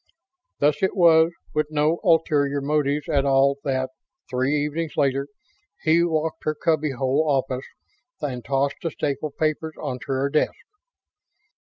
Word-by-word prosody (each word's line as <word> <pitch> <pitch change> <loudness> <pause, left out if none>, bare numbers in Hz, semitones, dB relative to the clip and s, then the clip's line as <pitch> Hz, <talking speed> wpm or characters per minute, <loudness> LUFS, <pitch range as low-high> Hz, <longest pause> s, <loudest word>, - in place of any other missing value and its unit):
Thus 145 0 +2
it 190 - +1
was 165 -3 +5 0.2
with 150 -1 +1
no 155 +2 +1
ulterior 150 -5 +2
motives 145 0 0
at 145 -4 +2
all 140 0 +3
that, 130 -2 -1 0.4
three 130 +3 +1
evenings 155 +1 -4
later, 140 -1 +1 0.6
he 165 +2 +4
walked 160 -1 -1
her 155 - -1
cubby 155 -2 0
hole 135 +4 +1
office 135 -1 -1 0.5
and 130 -5 -4
tossed 140 0 0
the 165 - -1
stapled 150 -1 -3
papers 155 0 -1
onto 125 -1 -5
her 135 +1 0
desk. 155 - +1
145 Hz, 140 wpm, -23 LUFS, 135-155 Hz, 0.6 s, was